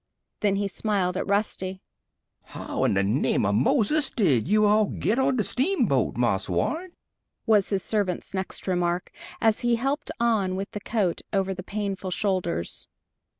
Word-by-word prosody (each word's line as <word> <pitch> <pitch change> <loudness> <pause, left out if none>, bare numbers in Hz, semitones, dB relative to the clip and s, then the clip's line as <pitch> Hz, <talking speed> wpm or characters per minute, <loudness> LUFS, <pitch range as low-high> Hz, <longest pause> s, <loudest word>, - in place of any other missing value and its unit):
Then 200 -2 +2
he 200 0 0
smiled 195 -3 -1
at 190 - -2
Rusty. 190 -2 -1 0.6
"How - - -4
in - - +2
de 100 - +3
name 105 +1 +1
of 100 - +1
Moses 260 - +2
did 150 - +2
you 215 +2 +4
all 210 +1 +4
git 225 +6 -1
on 265 0 +2
de 220 - +1
steamboat, 295 - +1
Marse - - +1
Warren?" 350 +3 -1 0.5
was 210 -3 +3
his 195 -3 0
servant's 200 -5 -1
next 190 -1 -3
remark, 175 -1 -1 0.3
as 225 -1 +3
he 240 -1 +2
helped 275 +5 -2
on 215 -6 +1
with 195 +2 -4
the 210 - -5
coat 205 -5 -1
over 195 -1 0
the 185 - -6
painful 195 -1 -4
shoulders. 185 - -2
200 Hz, 160 wpm, -26 LUFS, 185-220 Hz, 0.6 s, you